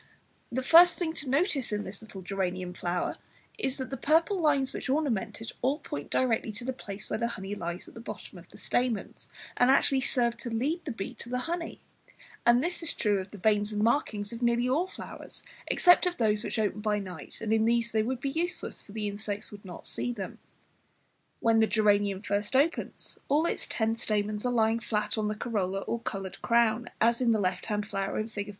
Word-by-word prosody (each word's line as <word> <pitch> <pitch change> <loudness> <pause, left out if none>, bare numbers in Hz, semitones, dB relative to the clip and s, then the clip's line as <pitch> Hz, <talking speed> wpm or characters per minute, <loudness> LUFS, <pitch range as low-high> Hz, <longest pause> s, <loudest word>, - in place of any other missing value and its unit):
The 260 +2 -1
first 345 +5 +8
thing 325 -3 -1
to 290 -5 -4
notice 280 - +1
in 210 0 -1
this 195 +2 -8
little 200 -4 -9
geranium 185 -1 -2
flower 175 0 -2 0.4
is 265 -9 -1
that 260 -1 -5
the 270 - -3
purple 325 +9 +3
lines 280 -4 +2
which - - -4
ornament 230 -7 0
it 225 - -5
all 270 +4 +2
point 145 - -6
directly 235 -3 +1
to 230 +4 -6
the 260 - -1
place 200 -4 -7
where - - -2
the 235 - +1
honey 195 -3 -5
lies 175 -2 -5
at - - -13
the - - -9
bottom 230 - -8
of - - -16
the - - -14
stamens, 245 -4 -1 0.3
and 245 - +5
actually 270 0 +5
serve 240 -2 +1
to 240 - -6
lead 275 +10 -1
the 290 - -2
bee 210 -4 -5
to 235 - -6
the 250 - -1
honey; 335 0 -4 0.7
and 240 +2 +6
this 350 +2 -2
is 330 - 0
true 205 -3 +2
of 190 0 -6
the 205 - -10
veins 210 +1 +2
and 210 0 0
marking 230 -3 +2
of 230 +4 -6
nearly 240 0 +2
all 305 +8 +2
flowers - - -9 0.2
except 355 0 +5
of 355 - -2
those 215 -3 +2
which 215 - -3
open 210 -1 0
by 210 -1 +1
night, 185 -6 -7
and 220 -1 0
in 220 0 +3
these 235 0 +2
they 220 - +2
would 250 +3 -2
be 275 +1 -2
useless, 345 +4 -2
for 200 - -13
the 215 -1 -2
insects 205 0 -4
would 205 -1 -11
not 180 -3 -9
see 245 - -2
them. 200 -6 -6 1.0
When 225 -1 +4
the 220 - +5
geranium 205 -2 +2
first 205 +3 -1
opens, 290 +6 0
all 300 +4 +3
its - - -1
ten 225 0 +1
stamens 210 +1 0
are - - +1
lying 225 -1 +3
flat 210 -2 -1
on 215 -2 0
the 210 - -1
corolla 195 -4 -1
or 235 - -2
coloured 195 -5 -5
crown, 235 0 +2
as 235 +2 +3
in 235 -2 +4
the 220 - +2
left 185 -2 -1
hand 210 -1 -1
flower 195 -2 -2
in 215 +1 -2
Fig. 205 -2 -5
225 Hz, 220 wpm, -29 LUFS, 205-260 Hz, 1.0 s, first